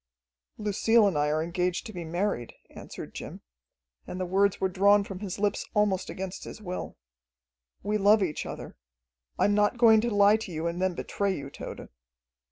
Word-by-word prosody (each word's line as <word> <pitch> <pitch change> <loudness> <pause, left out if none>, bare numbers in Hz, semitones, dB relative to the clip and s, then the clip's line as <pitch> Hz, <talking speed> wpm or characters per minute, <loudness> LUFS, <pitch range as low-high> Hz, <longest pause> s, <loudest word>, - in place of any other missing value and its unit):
"Lucille 215 +2 +3
and 195 -5 +1
I 145 0 +2
are 155 +1 0
engaged 180 +1 -1
to 220 - -8
be 175 -2 -5
married," 170 - -2 0.2
answered - - -9
Jim, - - -8 0.7
and 185 - -6
the 185 - -1
words 195 +2 +2
were 190 - +2
drawn 200 +2 +4
from 195 -2 -7
his 195 -3 -5
lips 205 0 0
almost 200 -3 +1
against 190 0 -6
his - - -9
will. 180 -3 -6 0.9
"We 210 +2 0
love 205 +1 +5
each 160 -5 -3
other. - - -8 0.6
I - - +3
am 205 - +3
not 210 +3 +2
going 225 -2 +6
to 240 - 0
lie 205 0 +5
to 220 -4 -7
you 160 0 -4
and 170 +2 -2
then 185 -2 +1
betray 200 +1 -2
you, 140 -1 -7
Tode." - - -8
195 Hz, 185 wpm, -28 LUFS, 180-210 Hz, 0.9 s, going